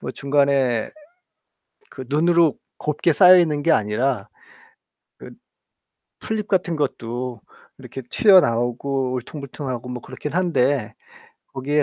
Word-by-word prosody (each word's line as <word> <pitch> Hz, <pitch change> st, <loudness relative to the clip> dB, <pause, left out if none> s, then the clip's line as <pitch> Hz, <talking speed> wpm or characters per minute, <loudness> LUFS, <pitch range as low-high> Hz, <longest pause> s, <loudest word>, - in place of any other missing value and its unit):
뭐 -, -, -5 dB
중간에 140 Hz, -4 st, 0 dB, 1.0 s
그 130 Hz, -, -9 dB
눈으로 165 Hz, +1 st, +2 dB, 0.2 s
곱게 150 Hz, +3 st, 0 dB
쌓여있는 175 Hz, -4 st, +5 dB
게 165 Hz, -, +3 dB
아니라 110 Hz, -1 st, 0 dB, 0.9 s
그 -, -, -12 dB, 0.9 s
풀잎 215 Hz, -1 st, -4 dB
같은 175 Hz, -3 st, 0 dB
것도 125 Hz, -4 st, -4 dB, 0.4 s
이렇게 135 Hz, -, -9 dB
튀어나오고 130 Hz, -, +2 dB
울퉁불퉁하고 130 Hz, -1 st, -6 dB
뭐 125 Hz, -1 st, -6 dB
그렇긴 130 Hz, +3 st, -7 dB
한데 140 Hz, -, 0 dB, 0.6 s
거기에 145 Hz, +3 st, 0 dB
140 Hz, 245 characters per minute, -21 LUFS, 125-160 Hz, 1.0 s, 쌓여있는